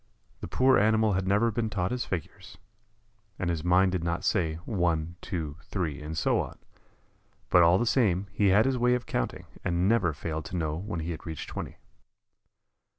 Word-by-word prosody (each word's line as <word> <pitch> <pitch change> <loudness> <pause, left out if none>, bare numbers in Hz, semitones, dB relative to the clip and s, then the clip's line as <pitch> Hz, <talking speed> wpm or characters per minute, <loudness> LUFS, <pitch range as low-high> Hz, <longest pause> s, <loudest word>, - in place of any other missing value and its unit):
The - - -6
poor 130 0 +4
animal 110 0 +3
had 95 0 -1
never 105 +4 +3
been 110 0 -1
taught 90 -3 -1
his 125 -1 -2
figures, 90 -4 -6 0.8
and 90 -2 -1
his 80 -2 -3
mind 90 +2 +4
did 90 -3 -2
not 85 0 -2
say 80 -7 +1
"one, 85 -5 0
two, 80 -5 -4
three," 80 -7 -3
and 80 +2 -6
so - - +2
on, - - -4 0.9
but 90 - +7
all 85 +2 +6
the 120 - 0
same 100 -7 +2
he 100 0 +2
had 100 +3 +5
his 130 -2 +1
way 125 +1 +3
of 125 -2 -4
counting, - - -3 0.2
and 85 +1 +1
never 105 -6 +3
failed 80 +1 -5
to 90 +2 -4
know 80 -2 -1
when 90 -1 -4
he 85 +2 -3
had 80 - -7
reached 80 -1 -6
twenty. - - -6
90 Hz, 190 wpm, -28 LUFS, 80-105 Hz, 0.9 s, but